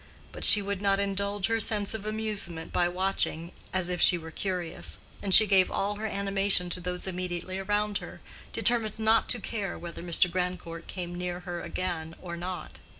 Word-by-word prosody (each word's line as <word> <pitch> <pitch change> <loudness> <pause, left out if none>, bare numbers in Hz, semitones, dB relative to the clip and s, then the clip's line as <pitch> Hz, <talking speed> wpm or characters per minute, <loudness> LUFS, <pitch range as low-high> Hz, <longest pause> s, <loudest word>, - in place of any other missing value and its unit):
But - - -8
she 210 - +8
would 200 -1 -3
not 195 -1 +2
indulge 200 0 -1
her 225 +1 +1
sense 210 -2 +1
of 215 -1 -5
amusement 210 -7 -3
by 175 - +2
watching, 180 -2 -2 0.2
as 185 -2 0
if 180 -1 -2
she 175 - +6
were 160 -1 -9
curious, 180 -1 -1 0.2
and 200 - -3
she 215 - +9
gave 190 -3 +4
all 205 +1 -2
her 220 +1 -3
animation 195 -3 +2
to 180 - -1
those 180 0 -1
immediately 185 0 -4
around 205 +1 0
her, - - -10 0.3
determined 230 -3 +2
not 220 0 +3
to 245 - +1
care 205 -6 -4
whether 170 -1 -8
Mr. 175 +1 +4
Grandcourt 180 -2 -4
came 175 -2 -6
near 180 0 -4
her 175 -1 -5
again 170 -3 -4
or 170 -2 -6
not. 180 +1 -6
185 Hz, 185 wpm, -28 LUFS, 175-205 Hz, 0.3 s, she